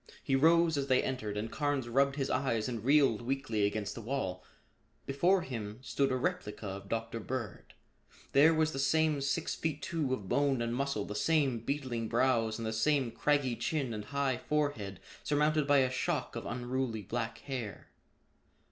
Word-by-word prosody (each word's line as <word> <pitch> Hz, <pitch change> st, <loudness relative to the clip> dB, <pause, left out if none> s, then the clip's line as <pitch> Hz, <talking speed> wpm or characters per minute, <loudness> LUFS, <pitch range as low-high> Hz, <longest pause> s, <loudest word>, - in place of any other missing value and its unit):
He 135 Hz, -, +1 dB
rose 165 Hz, +2 st, +4 dB
as 140 Hz, -, -2 dB
they 130 Hz, -1 st, +3 dB
entered 110 Hz, -6 st, -3 dB
and 110 Hz, +2 st, -3 dB
Carnes 145 Hz, -4 st, -1 dB
rubbed 135 Hz, +3 st, +2 dB
his 135 Hz, -2 st, -1 dB
eyes 115 Hz, -5 st, 0 dB
and 115 Hz, -4 st, -4 dB
reeled 135 Hz, -4 st, +4 dB
weakly 115 Hz, -5 st, 0 dB
against 105 Hz, 0 st, -3 dB
the -, -, -7 dB
wall. 105 Hz, -7 st, -3 dB, 0.6 s
Before 175 Hz, +7 st, +2 dB
him 110 Hz, -4 st, -5 dB
stood 135 Hz, +1 st, 0 dB
a -, -, +1 dB
replica 105 Hz, -4 st, -2 dB
of 100 Hz, 0 st, -6 dB
Dr. 115 Hz, 0 st, -2 dB
Bird. 115 Hz, -2 st, -6 dB, 0.6 s
There 150 Hz, +4 st, +6 dB
was 155 Hz, -1 st, +2 dB
the 135 Hz, -, -4 dB
same 150 Hz, +1 st, +2 dB
six 140 Hz, +4 st, -1 dB
feet 155 Hz, -3 st, -3 dB
two 155 Hz, -5 st, -1 dB
of 105 Hz, -7 st, -2 dB
bone 140 Hz, +2 st, +2 dB
and 115 Hz, 0 st, -1 dB
muscle, 135 Hz, -5 st, -1 dB
the -, -, -5 dB
same 130 Hz, +3 st, +2 dB
beetling 125 Hz, -2 st, -2 dB
brows 115 Hz, -2 st, +2 dB
and 115 Hz, -, -4 dB
the 110 Hz, -, -2 dB
same 130 Hz, +2 st, +2 dB
craggy 145 Hz, -3 st, +1 dB
chin 135 Hz, -5 st, -1 dB
and 105 Hz, -1 st, -5 dB
high 140 Hz, -1 st, 0 dB
forehead 130 Hz, -9 st, -1 dB, 0.2 s
surmounted 150 Hz, 0 st, +2 dB
by 145 Hz, 0 st, +5 dB
a 130 Hz, -1 st, +1 dB
shock 125 Hz, -, -2 dB
of -, -, -5 dB
unruly 120 Hz, -2 st, -2 dB
black 115 Hz, +2 st, -3 dB
hair. 115 Hz, -5 st, -6 dB
130 Hz, 175 wpm, -32 LUFS, 115-140 Hz, 0.6 s, There